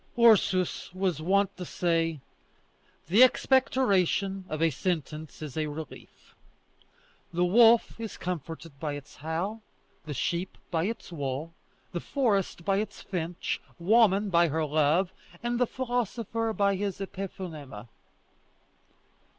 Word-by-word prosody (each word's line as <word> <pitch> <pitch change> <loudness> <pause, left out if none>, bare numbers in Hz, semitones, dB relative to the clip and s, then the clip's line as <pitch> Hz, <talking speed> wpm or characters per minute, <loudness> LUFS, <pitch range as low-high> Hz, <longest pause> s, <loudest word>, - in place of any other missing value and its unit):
Ursus 200 -6 +4
was 185 -5 0
wont 195 +4 +2
to 185 - -5
say: 165 -3 0 0.8
"The 200 +8 +4
expectoration 200 -7 +3
of 155 - -3
a 165 0 +3
sentence 155 0 -3
is 150 -4 -7
a 155 -1 -1
relief. 150 +1 -9 1.0
The 175 +1 +1
wolf 230 +5 +5
is 225 -3 -6
comforted 165 -3 -6
by 150 -1 -2
its 145 0 -9
howl, 170 +9 -3 0.5
the 150 - -4
sheep 170 +8 -2
by 165 -1 +1
its 225 -3 -5
wool, 145 +1 -4 0.4
the 175 - -2
forest 200 - 0
by 195 -1 +2
its 215 +2 -4
finch, 175 -2 -3 0.2
woman 205 +1 +4
by 170 0 +5
her 160 +1 0
love, 155 +5 +2 0.3
and 240 0 -1
the 245 - +3
philosopher 230 -3 -2
by 200 -2 +2
his 200 -1 -2
epiphonema." 170 - -7
180 Hz, 125 wpm, -28 LUFS, 160-205 Hz, 1.0 s, wolf